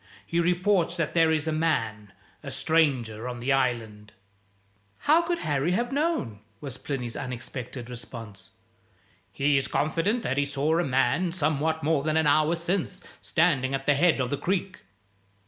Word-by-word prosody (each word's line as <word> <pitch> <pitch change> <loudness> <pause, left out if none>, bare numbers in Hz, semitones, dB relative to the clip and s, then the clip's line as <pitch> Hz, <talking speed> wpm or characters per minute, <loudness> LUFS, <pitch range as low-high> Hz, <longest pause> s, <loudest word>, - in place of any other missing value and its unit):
He 170 - -1
reports 175 0 +2
that 165 -3 -1
there 165 -1 +4
is 155 -1 0
a - - +1
man 115 -10 -1 0.3
a - - -7
stranger 125 -8 +1
on 125 -1 -5
the 125 +3 0
Island." 115 -5 -1 0.9
"How 310 +3 +5
could 345 0 -1
Harry 150 - 0
have 240 +6 0
known?" 280 - -1 0.2
was 135 -3 -7
Plinny's 125 -5 -4
unexpected 125 0 -6
response. 115 -5 -9 0.8
"He 140 0 +2
is 135 - 0
confident 175 +10 0
that 135 - 0
he 145 - +2
saw 145 +4 +1
a - - +2
man, 135 +6 +1
somewhat 160 -1 0
more 155 -1 +2
than 155 +2 0
an 160 - +3
hour 155 +3 +3
since, 170 +2 -2 0.2
standing 140 -6 +2
at 135 0 -5
the 145 - +4
head 160 +2 +3
of 125 -1 -1
the 145 - 0
creek." 185 +1 -2
145 Hz, 165 wpm, -26 LUFS, 125-170 Hz, 0.9 s, How